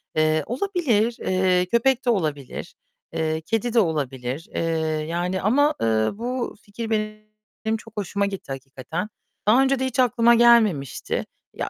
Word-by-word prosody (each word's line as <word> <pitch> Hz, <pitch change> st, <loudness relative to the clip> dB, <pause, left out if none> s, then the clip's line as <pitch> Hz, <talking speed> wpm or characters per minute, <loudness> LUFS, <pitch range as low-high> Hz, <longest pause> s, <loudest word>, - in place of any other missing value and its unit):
Eee, 155 Hz, -1 st, +2 dB
olabilir. 245 Hz, -, 0 dB
Eee, 185 Hz, -1 st, +2 dB
köpek 245 Hz, +5 st, +2 dB
de -, -, +2 dB
olabilir, 155 Hz, -, -2 dB, 0.4 s
eee, 160 Hz, 0 st, -1 dB
kedi 225 Hz, +6 st, -1 dB
de 235 Hz, -, +5 dB
olabilir. 140 Hz, -, -2 dB
Eee, -, -, 0 dB, 0.5 s
yani 175 Hz, +2 st, -1 dB
ama, 285 Hz, +8 st, +3 dB
eee, -, -, +2 dB, 0.3 s
bu 245 Hz, +3 st, -3 dB
fikir 220 Hz, +2 st, -7 dB
benim 215 Hz, 0 st, -4 dB
çok 220 Hz, 0 st, -15 dB
hoşuma 200 Hz, 0 st, -1 dB
gitti 195 Hz, -8 st, -6 dB
hakikaten. 135 Hz, +8 st, -5 dB, 0.4 s
Daha 240 Hz, +5 st, +6 dB
önce 270 Hz, -1 st, +2 dB
de 260 Hz, -, 0 dB
hiç 260 Hz, 0 st, -3 dB
aklıma 235 Hz, -1 st, +5 dB
gelmemişti. 220 Hz, -, +3 dB, 0.3 s
Ya, -, -, -4 dB
215 Hz, 145 wpm, -23 LUFS, 165-235 Hz, 0.5 s, Daha